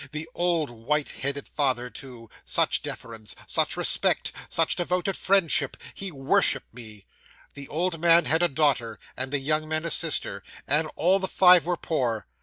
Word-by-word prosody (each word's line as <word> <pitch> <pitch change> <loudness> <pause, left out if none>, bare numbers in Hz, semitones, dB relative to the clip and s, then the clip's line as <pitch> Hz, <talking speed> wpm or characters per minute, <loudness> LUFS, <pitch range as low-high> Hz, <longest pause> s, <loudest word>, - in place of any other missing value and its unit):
The 155 +1 -6
old, 170 -5 -1
white 140 +6 -2
headed 140 +1 -5
father, 130 -4 -1
too 125 -4 -10 0.2
such - - +1
deference 110 -2 -7
such - - +1
respect - - +2 0.2
such - - +1
devoted 180 +2 -1
friendship 170 -8 +2 0.2
he 195 -1 -5
worshipped 135 -5 0
me! 110 -4 -11 0.5
The 140 -1 -8
old 165 +2 -2
man 170 0 +5
had 160 +2 +2
a 175 - +4
daughter, 135 -7 0 0.2
and 130 +1 -3
the 145 - +1
young 155 +3 -1
men 155 +1 -1
a 170 - -2
sister; - - +1 0.2
and 155 +3 +1
all 185 +3 +3
the 190 - -3
five 180 -2 +5
were 175 -1 0
poor. 120 -11 -2
150 Hz, 165 wpm, -25 LUFS, 130-170 Hz, 0.5 s, man